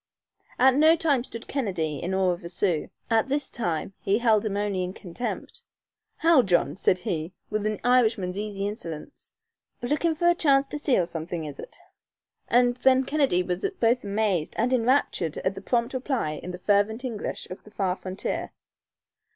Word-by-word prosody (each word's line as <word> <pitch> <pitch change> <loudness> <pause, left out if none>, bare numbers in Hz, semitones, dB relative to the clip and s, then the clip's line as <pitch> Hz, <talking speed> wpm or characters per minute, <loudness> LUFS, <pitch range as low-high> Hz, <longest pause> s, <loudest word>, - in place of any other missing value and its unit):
At 260 +1 +6
no 310 +4 +6
time 290 -7 +1
stood 230 -2 -9
Kennedy 175 - -2
in 185 +2 -2
awe 190 -1 +3
of 175 - -5
a 170 - -6
Sioux. 175 -3 0 0.2
At 225 +1 +3
this 285 0 0
time 175 -5 -2
he 200 +2 +1
held 225 -3 +3
him 200 -1 -2
only 200 -3 -1
in 180 +1 -4
contempt. 190 +7 -6 0.5
"How, 325 -4 +5
John," 180 -6 +1
said 185 - +2
he, 170 -1 -3 0.2
with 215 0 0
an 215 -1 -2
Irishman's 225 -6 +2
easy 205 -1 -3
insolence, 205 - -7 0.5
"Lookin' 305 +6 +1
for 345 +3 +1
a 345 - +6
chance 280 -5 +3
to 295 - -5
steal 255 - +2
somethin' 165 0 -5
is 145 -2 -8
it?" - - -10 0.7
And 245 0 +3
then 260 0 +4
Kennedy 275 -11 +2
was 180 0 -3 0.2
both 240 +2 +2
amazed 200 -5 -1
and 245 +3 +1
enraptured 235 - +1
at 185 - -1
the 195 - -8
prompt 235 +4 0
reply 260 - -1
in 180 - -7
the 180 - -5
fervent 205 +6 +1
English 230 -5 -4
of 185 - -8
the - - -15
far 195 -3 -1
frontier. 185 +1 -4
210 Hz, 175 wpm, -26 LUFS, 180-255 Hz, 0.7 s, At